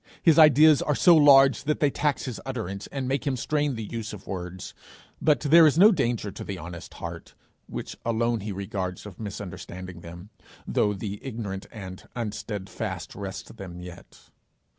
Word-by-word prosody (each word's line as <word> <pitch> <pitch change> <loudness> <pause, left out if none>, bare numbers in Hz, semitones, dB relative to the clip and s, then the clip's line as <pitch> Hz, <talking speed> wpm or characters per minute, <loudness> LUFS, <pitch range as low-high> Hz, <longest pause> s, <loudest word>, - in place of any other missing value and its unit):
His 165 -2 +6
ideas 155 0 +7
are 150 - 0
so 175 +3 +6
large 140 -3 +6
that 150 +1 0
they 145 -2 +3
tax 145 0 -1
his 125 -4 -5
utterance 105 -7 -5
and 135 -2 -4
make 135 +2 -1
him 135 -2 0
strain 145 +2 0
the 110 - -5
use 115 +1 -5
of 100 - -10
words, 90 -1 -6 0.5
but 150 -1 +3
there 160 +2 +7
is 150 - +2
no 205 +5 +8
danger 120 - -1
to 95 - -8
the 100 - -5
honest 85 +2 -9
heart, 85 -1 -8 0.3
which - - -6
alone 115 0 0
he 105 +1 -5
regards, 95 -1 -4
of 100 -4 -11
misunderstanding 95 -4 -7
them, 85 +5 -11 0.3
though 105 - +1
'the 100 0 -6
ignorant 110 -7 -5
and 95 -4 -9
unsteadfast 105 -4 -5
wrest - - -7
them' 90 -2 -8
yet. 90 -1 -13
110 Hz, 170 wpm, -26 LUFS, 95-140 Hz, 0.5 s, no